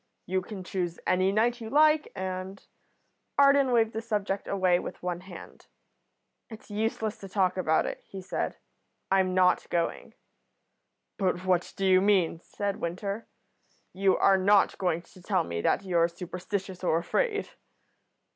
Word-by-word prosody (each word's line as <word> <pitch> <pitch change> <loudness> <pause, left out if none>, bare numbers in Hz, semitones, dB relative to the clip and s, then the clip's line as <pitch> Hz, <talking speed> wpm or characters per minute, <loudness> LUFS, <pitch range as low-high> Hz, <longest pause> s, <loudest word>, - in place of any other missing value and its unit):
You 185 +1 0
can 190 0 -8
choose 180 -2 -3
any 185 +1 +2
night 235 +4 +1
you 220 - -6
like, 305 +2 +4
and 190 0 -5 0.4
" - - -48
Arden 280 -2 +5
waved 225 -2 +3
the 220 - -3
subject 205 -3 -2
away 185 -3 +2
with - - -8
one 175 -1 -2
hand. 180 -2 -12 0.8
"It's 220 -1 -12
useless 220 +1 -2
to 195 - -9
talk 185 -2 +1
about 160 -4 +2
it," - - -4
he 195 - -8
said, 185 - -3 0.5
"I'm 190 -1 +2
not 180 -1 +3
going." 170 -1 -2 1.0
"But 185 -2 0
what 180 -1 +1
do 195 - -1
you 185 -1 +5
mean?" 190 -5 +2
said 200 +3 -4
Winter. 195 +6 -4 0.7
"You 190 0 +2
are 195 -1 +4
not 200 +1 +4
going 175 -3 0
to 185 - -18
tell - - +1
me 85 0 -4
that - - +1
you're 170 -3 +2
superstitious 180 +2 -5
or 165 -2 +2
afraid?" 420 - -1
190 Hz, 155 wpm, -28 LUFS, 180-210 Hz, 1.0 s, Arden